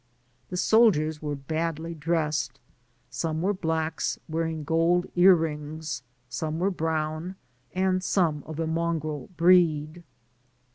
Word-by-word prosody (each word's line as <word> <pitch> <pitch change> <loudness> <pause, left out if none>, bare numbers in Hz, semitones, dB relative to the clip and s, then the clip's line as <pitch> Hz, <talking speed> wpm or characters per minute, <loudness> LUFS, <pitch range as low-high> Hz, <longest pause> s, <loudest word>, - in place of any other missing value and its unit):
The 180 - -4
soldiers 175 -8 +3
were 150 -1 -3
badly 160 +3 -3
dressed; 155 -3 -1 0.5
some 160 +5 -2
were 200 +2 +2
blacks, 160 -3 -1
wearing 160 -1 -2
gold 165 +3 +2
ear 185 +1 +7
rings, 155 -2 -4 0.3
some 155 +6 -3
were 190 +4 +1
brown, 160 +1 -2 0.4
and 185 0 +1
some 165 -6 +1
of 160 0 -6
a 165 - 0
mongrel 160 -3 -2
breed. 170 -2 +4
160 Hz, 115 wpm, -27 LUFS, 155-175 Hz, 0.5 s, ear